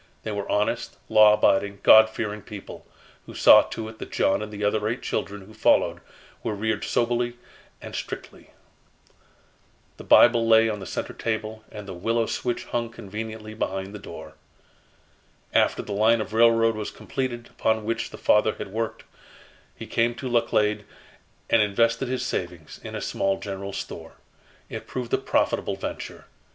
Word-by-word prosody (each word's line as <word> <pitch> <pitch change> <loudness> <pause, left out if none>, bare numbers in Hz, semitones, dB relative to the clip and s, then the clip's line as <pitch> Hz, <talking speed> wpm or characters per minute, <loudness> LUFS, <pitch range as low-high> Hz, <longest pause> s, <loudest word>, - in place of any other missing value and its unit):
They 110 - -4
were 100 -1 -4
honest, 105 +1 -1
law 105 -1 +7
abiding, 100 -1 +2
God 110 0 +8
fearing 105 -1 -4
people, 100 -1 -10 0.4
who - - -10
saw - - +8
to 110 -1 -6
it 110 0 -11
that - - -8
John 95 - +1
and 105 0 -6
the 105 0 -6
other 105 +1 +1
eight 120 +4 -3
children 100 -1 -3
who 110 - -15
followed 110 - +2 0.4
were 105 - -3
reared 110 +2 -1
soberly 120 0 0 0.5
and - - -8
strictly. - - -7 1.5
The - - -10
Bible 120 -1 +6
lay 115 0 +6
on 105 -2 -2
the 95 - -8
center - - -4
table 110 -1 -4
and 105 -2 -9
the 95 - -6
willow 115 +6 0
switch 120 +2 -3
hung 120 -1 -2
conveniently 110 0 -7
behind 95 -2 -3
the 105 - -7
door. 80 -5 -10 1.2
After - - +2
the 105 - -6
line 110 +3 +3
of 110 - -5
railroad 115 0 +4
was 110 -1 -4
completed 120 -3 -5
upon 110 -1 0
which 115 +1 -2
the - - -10
father 105 0 +3
had - - -7
worked, 110 +1 -3 0.7
he - - -8
came 115 +1 0
to 130 - -6
Laclede 105 -3 +1 0.6
and 115 - +4
invested 115 +4 +1
his 130 0 -2
savings 85 -3 -5
in - - -7
a - - -4
small 95 0 0
general 100 0 -6
store. - - -7 0.5
It - - -7
proved 125 -2 -5
a - - +3
profitable - - 0
venture. - - -7
110 Hz, 165 wpm, -25 LUFS, 105-115 Hz, 1.5 s, God